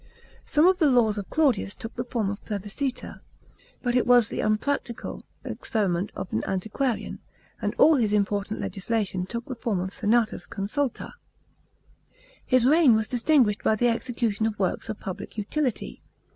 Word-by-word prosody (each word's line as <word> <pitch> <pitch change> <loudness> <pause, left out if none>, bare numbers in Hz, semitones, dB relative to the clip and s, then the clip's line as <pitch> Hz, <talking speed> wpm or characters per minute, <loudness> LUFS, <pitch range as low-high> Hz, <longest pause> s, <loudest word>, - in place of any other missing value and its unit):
Some 300 +2 +4
of 370 0 +4
the 310 -4 +5
laws 225 -5 +3
of 200 - -7
Claudius 265 -10 +1
took 225 - -8
the 240 - -2
form 230 -5 -1
of 205 - -8
plebiscites. 210 +6 -4 0.6
But 245 -1 0
it 250 - +2
was 245 -2 +5
the - - -4
unpractical 230 +3 -2 0.2
experiment 195 -4 -1
i>f 185 - -5
an 110 - 0
antiquarian,* 220 +6 -2 0.4
and - - -2
all 315 -2 +6
his 220 -5 +1
important 205 0 0
legislation 195 -3 -2
took 235 +3 -5
the 260 - -5
form 230 -5 -2
of 190 +1 -3
senatusconsulta. 225 +2 0
§ - - -8
8. - - -15 1.3
His 255 -2 +4
reign 290 -3 +6
was 220 -1 0
distinguished 245 -4 +2
by 220 - +3
the 240 +3 +2
execution 230 -2 -1
of 215 -2 -4
works 190 +3 -1
of 215 - -4
public 195 +3 -7
utility. 250 +4 -2
225 Hz, 160 wpm, -26 LUFS, 205-250 Hz, 1.3 s, all